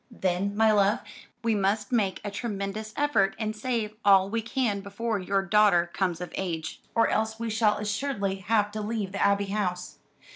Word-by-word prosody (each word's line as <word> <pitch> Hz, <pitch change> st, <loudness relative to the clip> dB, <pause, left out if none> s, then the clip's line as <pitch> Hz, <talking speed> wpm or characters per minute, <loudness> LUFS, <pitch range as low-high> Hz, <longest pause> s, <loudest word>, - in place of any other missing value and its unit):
"Then, 195 Hz, -2 st, -1 dB
my 220 Hz, 0 st, +5 dB
love, 205 Hz, +1 st, +3 dB, 0.4 s
we 230 Hz, -1 st, +2 dB
must 205 Hz, +2 st, 0 dB
make 205 Hz, -6 st, +1 dB
a 205 Hz, -, -4 dB
tremendous 210 Hz, 0 st, -4 dB
effort 285 Hz, -10 st, +2 dB
and 215 Hz, -1 st, -3 dB
save 220 Hz, -2 st, -2 dB
all 195 Hz, -1 st, +5 dB
we 230 Hz, 0 st, 0 dB
can 230 Hz, -3 st, -1 dB
before 205 Hz, +2 st, -3 dB
your 195 Hz, +1 st, 0 dB
daughter 195 Hz, -3 st, +4 dB
comes 180 Hz, -4 st, -1 dB
of 180 Hz, -2 st, -7 dB
age, 165 Hz, -4 st, -4 dB
or 230 Hz, 0 st, +4 dB
else 220 Hz, +1 st, -1 dB
we 230 Hz, -1 st, -2 dB
shall 215 Hz, -1 st, +2 dB
assuredly 205 Hz, -2 st, -2 dB
have 205 Hz, +1 st, +1 dB
to 215 Hz, 0 st, -4 dB
leave 210 Hz, -2 st, -3 dB
the 200 Hz, -, -3 dB
Abbey 200 Hz, 0 st, +3 dB
House. 180 Hz, -4 st, -3 dB
205 Hz, 180 wpm, -27 LUFS, 195-220 Hz, 0.4 s, my